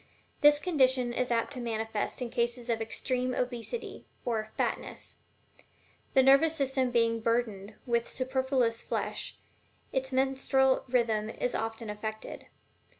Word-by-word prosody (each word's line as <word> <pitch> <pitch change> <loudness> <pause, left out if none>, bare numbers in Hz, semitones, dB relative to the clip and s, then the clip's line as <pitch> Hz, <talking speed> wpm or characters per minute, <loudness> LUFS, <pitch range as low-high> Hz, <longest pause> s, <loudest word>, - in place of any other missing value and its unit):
This 295 0 +8
condition 260 -7 +2
is 250 +1 -1
apt 235 +3 0
to 255 - -6
be 240 - -5
manifest 220 +1 -2
in 235 - -5
cases 240 0 -1
of 225 -1 -1
extreme 250 +2 -1
obesity 250 - -4 0.2
or 220 -2 -1
"fatness;" - - -3 1.0
the 265 - +7
nervous 275 +4 +6
system 265 -3 +1
being 230 -1 +2
burdened 220 -3 -1
with 235 -2 +1
superfluous 260 -2 0
flesh, - - -3 0.5
its 265 0 -1
menstrual 265 0 +2
rhythm 230 -4 +1
is 245 +2 -2
often 225 0 -3
affected. 215 +1 -6
245 Hz, 130 wpm, -30 LUFS, 230-265 Hz, 1.0 s, This